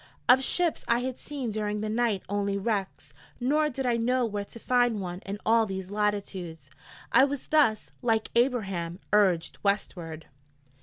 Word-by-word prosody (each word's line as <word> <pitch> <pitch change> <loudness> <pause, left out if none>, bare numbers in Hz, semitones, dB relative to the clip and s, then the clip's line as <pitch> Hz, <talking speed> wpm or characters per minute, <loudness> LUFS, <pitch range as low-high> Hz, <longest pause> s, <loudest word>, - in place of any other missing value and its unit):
Of 260 +2 +6
ships 345 +4 +1
I 235 +1 +2
had 255 0 -4
seen 270 -6 -4
during 210 0 -2
the 215 - -2
night 220 -3 0
only 200 0 -1
wrecks, 200 -1 -3 0.3
nor 300 +5 +2
did 270 -1 -4
I 240 -2 +2
know 250 +2 +1
where 205 -2 -3
to 230 - -12
find 245 -2 +2
one 180 -2 -5
in 200 +1 -3
all 225 0 +4
these 190 -1 -5
latitudes. 190 -8 -3 0.4
I 260 - +7
was 280 -1 -1
thus, 285 -9 +3
like 225 -3 +1
her 235 - +6
'Ablaham,' 195 -9 -2 0.2
urged 185 -6 +2
Westward. 175 -6 -2
215 Hz, 165 wpm, -28 LUFS, 195-245 Hz, 0.4 s, I